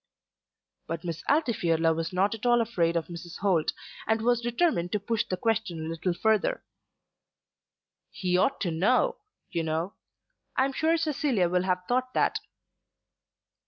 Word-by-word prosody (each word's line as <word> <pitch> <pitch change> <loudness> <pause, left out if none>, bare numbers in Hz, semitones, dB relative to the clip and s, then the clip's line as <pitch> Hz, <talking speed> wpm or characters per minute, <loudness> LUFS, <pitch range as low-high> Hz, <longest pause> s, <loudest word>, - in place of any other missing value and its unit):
But 165 0 -4
Miss 170 -2 -4
Altifiorla 170 - +2
was 165 +2 -3
not 190 +3 +2
at 225 - -8
all 240 -1 +4
afraid 175 -8 +1
of 165 - -1
Mrs. 175 0 -8
Holt, 180 -6 +2 0.4
and 220 0 +2
was 240 0 +3
determined 240 - +1
to 210 - +1
push 220 +2 0
the 185 - -2
question 225 -6 0
a 160 0 -4
little 165 +2 -2
further. 220 +2 +1 1.5
"He 180 -2 -1
ought 230 +10 +2
to 175 - 0
know, 255 - +2 0.3
you 170 - 0
know. 160 +4 -2 0.6
I 260 - +4
am 275 - -2
sure 320 +4 +2
Cecilia 285 - +1
will 180 0 +2
have 180 -1 0
thought 255 +1 0
that." - - +2
195 Hz, 155 wpm, -28 LUFS, 170-240 Hz, 1.5 s, all